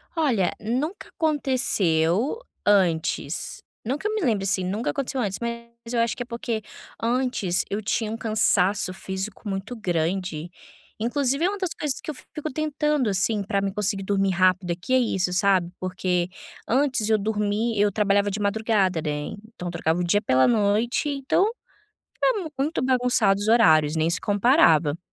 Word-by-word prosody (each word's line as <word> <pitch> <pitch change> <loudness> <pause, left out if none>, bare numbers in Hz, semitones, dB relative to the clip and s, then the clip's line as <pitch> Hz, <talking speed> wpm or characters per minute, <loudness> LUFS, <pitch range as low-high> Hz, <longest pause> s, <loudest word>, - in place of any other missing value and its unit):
Olha, 250 - +1
nunca 265 - -3
aconteceu 250 - +1 0.3
antes, 175 -6 +1 0.2
não 260 +5 -1
que 400 - -3
eu 430 - -2
me 430 - -1
lembre, 220 - +1
assim, 190 -1 0
nunca 200 +6 -2
aconteceu 270 -2 -2
antes. 195 -4 -2
Mas, 235 0 -7
eu 235 - +1
acho 230 -1 0
que 245 - -3
é - - -14
porque 235 -2 -3 0.4
antes 235 -6 0
eu 205 +2 -2
tinha 215 +1 -1
um 225 - -4
cansaço 210 -4 +1
físico 190 +3 -6
muito 195 +4 -4
grande, 175 -4 -2 0.5
inclusive 275 +6 0
é - - +3
uma 405 - -4
das 375 -3 -2
coisas 290 -3 -2
que - - -8
eu - - -10
fico 305 +4 -7
tentando, 300 -3 0
assim, 200 +2 0
para 195 0 -1
mim 195 0 -1
conseguir 195 -1 -1
dormir 195 0 +1
rápido 185 0 +2
aqui 175 +9 -3
é - - +6
isso, 190 -7 0
sabe, 180 -1 +2
porque 180 -1 -1 0.4
antes 260 -3 +1
eu 220 - +4
dormi 210 +1 -1
eu 205 0 +3
trabalhava 200 0 +2
de 205 - -3
madrugada, 200 -4 +1
né. 150 -1 -3 0.2
Então, 180 -4 -6
trocava 170 -1 -1
o - - 0
dia 205 +4 +2
pela 130 -8 +3
noite, 220 +5 +1
então 280 +6 +1 0.7
ficava 410 -10 0
muito 295 +2 0
bagunçado 250 -6 +2
os 205 - -2
horários, 160 -10 +5
nem 160 +1 +1
se 175 - -1
comparava, 190 - +3
210 Hz, 165 wpm, -24 LUFS, 185-250 Hz, 0.7 s, é